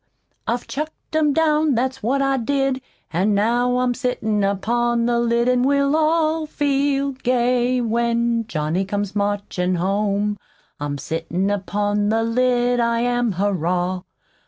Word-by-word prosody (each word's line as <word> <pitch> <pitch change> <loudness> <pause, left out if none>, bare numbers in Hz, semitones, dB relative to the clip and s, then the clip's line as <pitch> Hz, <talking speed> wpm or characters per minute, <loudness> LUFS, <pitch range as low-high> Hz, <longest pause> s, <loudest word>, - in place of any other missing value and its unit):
I 235 - +1
chucked 305 +5 -7
'em 305 -2 +3
down, 305 -1 +2
that's 260 +3 -1
what 275 +5 +1
I 275 0 +1
did, 270 +1 0 0.3
An' 195 +5 +2
now 240 +4 +2
I'm 250 -1 +1
sittin' 220 -5 -1
upon 235 +4 +1
the 240 0 +1
lid, 235 0 +1
An' 250 0 +3
we'll 280 +2 +2
all 315 0 +1
feel 280 -1 0
gay 250 -1 +1
when 235 0 0
Johnny 155 +4 -1
comes 205 +1 -3
marchin' 200 -3 -1
home. 200 +3 0 0.4
I'm 145 0 -3
sittin' 170 +7 -2
upon 205 +1 0
the 225 +1 +1
lid, 245 +1 +1
I 235 0 +1
am, 245 -2 +1
Hurrah! 180 -1 -1
235 Hz, 135 wpm, -21 LUFS, 205-260 Hz, 0.4 s, em